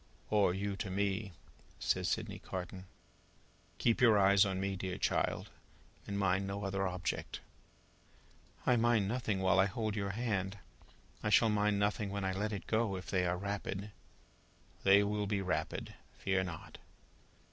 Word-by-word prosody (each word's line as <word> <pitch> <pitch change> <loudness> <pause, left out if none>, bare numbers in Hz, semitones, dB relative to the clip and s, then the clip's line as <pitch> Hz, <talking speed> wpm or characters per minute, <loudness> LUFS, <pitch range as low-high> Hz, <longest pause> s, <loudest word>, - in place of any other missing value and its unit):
"Or 105 -4 +4
you 100 +2 -2
to 95 - -4
me," 100 +1 -1 0.5
says - - 0
Sydney - - -2
Carton. 95 0 -6 0.9
"Keep 115 +1 +2
your 115 -4 +7
eyes 100 0 +6
upon 95 -1 -1
me, 95 0 -1
dear 90 -1 -4
child, - - 0 0.6
and 100 - -3
mind 95 0 +1
no 100 +1 -4
other 95 -1 0
object." 90 -1 -3 1.3
"I 125 -2 +4
mind 115 -3 +3
nothing 105 -4 -1
while 95 0 +4
I 95 - +5
hold 110 0 -2
your 100 -2 -1
hand. 100 -3 -2 0.6
I 105 - 0
shall 105 +3 +5
mind 105 -1 +2
nothing 105 0 0
when 100 0 -3
I 95 - +1
let 105 +3 -1
it 100 - -4
go, 110 -3 +1
if 95 - -7
they 90 -2 +2
are 90 +1 0
rapid." 100 +1 -4 0.9
"They 100 +1 +6
will 105 0 -1
be 100 0 0
rapid. 90 -1 -2 0.2
Fear 95 -1 0
not!" 85 -3 -8
100 Hz, 160 wpm, -34 LUFS, 95-105 Hz, 1.3 s, your